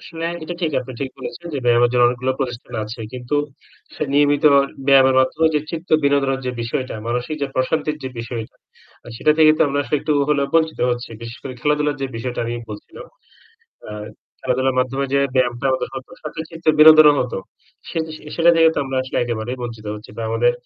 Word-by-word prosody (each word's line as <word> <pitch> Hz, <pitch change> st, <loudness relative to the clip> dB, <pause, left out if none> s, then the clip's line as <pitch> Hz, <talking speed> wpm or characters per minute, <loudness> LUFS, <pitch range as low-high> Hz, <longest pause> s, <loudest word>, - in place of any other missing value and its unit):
আসলে 165 Hz, -1 st, -7 dB, 0.2 s
এটা 175 Hz, +2 st, -5 dB
ঠিক 160 Hz, -, +1 dB
আপনি 130 Hz, +1 st, -8 dB
ঠিক 135 Hz, -1 st, -3 dB
বলেছেন 170 Hz, +6 st, -8 dB
যে -, -, -1 dB
ব্যায়ামের 120 Hz, 0 st, +4 dB
জন্য 125 Hz, -1 st, +4 dB
অনেকগুলো 125 Hz, +2 st, -1 dB
প্রতিষ্ঠান 120 Hz, -2 st, -5 dB
আছে। 115 Hz, +3 st, -8 dB
কিন্তু 125 Hz, +2 st, -4 dB, 0.6 s
সে -, -, -4 dB
নিয়মিত 145 Hz, 0 st, +3 dB, 0.4 s
ব্যায়ামের 135 Hz, -1 st, +6 dB
মাধ্যমে 160 Hz, +5 st, +2 dB
যে 150 Hz, -, +2 dB
চিত্ত 165 Hz, +1 st, -6 dB, 0.2 s
বিনোদনের 140 Hz, -1 st, +2 dB
যে -, -, 0 dB
বিষয়টা 130 Hz, +3 st, -3 dB
মানসিক 125 Hz, +6 st, -2 dB
যে -, -, +1 dB
প্রশান্তির 150 Hz, +3 st, 0 dB
যে 130 Hz, -, -3 dB
বিষয়টা, 115 Hz, -1 st, -6 dB, 0.5 s
আর 120 Hz, -, -10 dB
সেটা 150 Hz, -, +3 dB
থেকে 155 Hz, -1 st, +7 dB
তো -, -, +5 dB
আমরা 140 Hz, +1 st, -1 dB
আসলে 140 Hz, +3 st, -1 dB
একটু 155 Hz, -, 0 dB, 0.2 s
হলেও 140 Hz, -2 st, +2 dB
বঞ্চিত 160 Hz, -1 st, +2 dB
হচ্ছি। 120 Hz, +1 st, -3 dB
বিশেষ 115 Hz, +1 st, -8 dB
করে 135 Hz, -, -6 dB
খেলাধুলার 150 Hz, 0 st, +1 dB
যে 135 Hz, -, -1 dB
বিষয়টা 125 Hz, +1 st, -4 dB
আমি 120 Hz, +1 st, -3 dB, 0.2 s
বলছিলাম, 285 Hz, -, -10 dB, 0.8 s
আ -, -, -7 dB, 0.5 s
খেলাধুলার 130 Hz, 0 st, 0 dB
মাধ্যমে 135 Hz, +2 st, -1 dB
যে 140 Hz, -, +4 dB, 0.2 s
ব্যায়ামটা 125 Hz, 0 st, +1 dB
আমাদের 130 Hz, -, -1 dB, 0.4 s
সাথে 155 Hz, +1 st, -7 dB
চিত্ত 165 Hz, -1 st, -12 dB
বিনোদনের 155 Hz, -1 st, +9 dB
মতো। 125 Hz, -, -2 dB, 0.5 s
সে -, -, -5 dB, 0.4 s
সেটা 170 Hz, 0 st, +4 dB
থেকে 165 Hz, 0 st, +6 dB
তো -, -, 0 dB
আমরা 135 Hz, -1 st, -3 dB
আসলে 130 Hz, -, -4 dB
একেবারেই 120 Hz, +1 st, -3 dB
বঞ্চিত 115 Hz, -3 st, -7 dB
হচ্ছি। 105 Hz, -, -12 dB
বা -, -, -4 dB
আমাদের 115 Hz, +2 st, +3 dB
130 Hz, 190 wpm, -20 LUFS, 120-150 Hz, 0.8 s, বিনোদনের